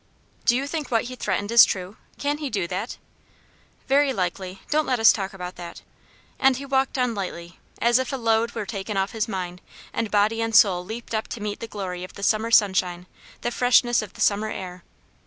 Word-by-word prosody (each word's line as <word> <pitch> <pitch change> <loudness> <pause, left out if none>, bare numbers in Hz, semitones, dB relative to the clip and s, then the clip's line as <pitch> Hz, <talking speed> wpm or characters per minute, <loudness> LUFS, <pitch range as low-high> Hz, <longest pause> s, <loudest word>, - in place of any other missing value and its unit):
"Do 240 - +4
you 265 +2 0
think 300 -1 -4
what 230 -2 +2
he 255 +1 -7
threatened 205 -2 -2
is 235 - +9
true? 185 +1 -1 0.2
Can 290 +1 -1
he 295 -3 -3
do 205 -6 -1
it?" 185 +7 -4 0.9
"Very 280 +1 +3
likely; 185 -2 -3
don't 305 0 +2
let 250 -2 +1
us 225 - +7
talk 195 -2 -3
about 180 -2 -7
that." 175 -1 -9 0.6
And 270 -2 +4
he 275 - -6
walked 270 0 0
on 250 -2 +1
lightly, 175 -4 -6 0.2
as 240 +1 +4
if 260 - -2
a - - -1
load 230 -1 +1
were 220 -2 -3
taken 200 0 -4
off 195 +1 0
his 225 0 -2
mind, 180 -3 -5 0.3
and 225 -2 -1
body 215 +2 +2
and 225 -1 -1
soul 185 -5 +5
leaped 225 +5 -7
up 220 0 -1
to - - -6
meet 210 0 -4
the 230 - -6
glory 185 -4 -5
of 185 - -9
the 200 - -8
summer 220 +2 +2
sunshine, 190 -5 +3 0.4
the 240 - -2
freshness 245 -1 +3
of 215 - -9
the - - -9
summer 210 +1 +2
air. 180 -3 -7
220 Hz, 210 wpm, -24 LUFS, 190-240 Hz, 0.9 s, is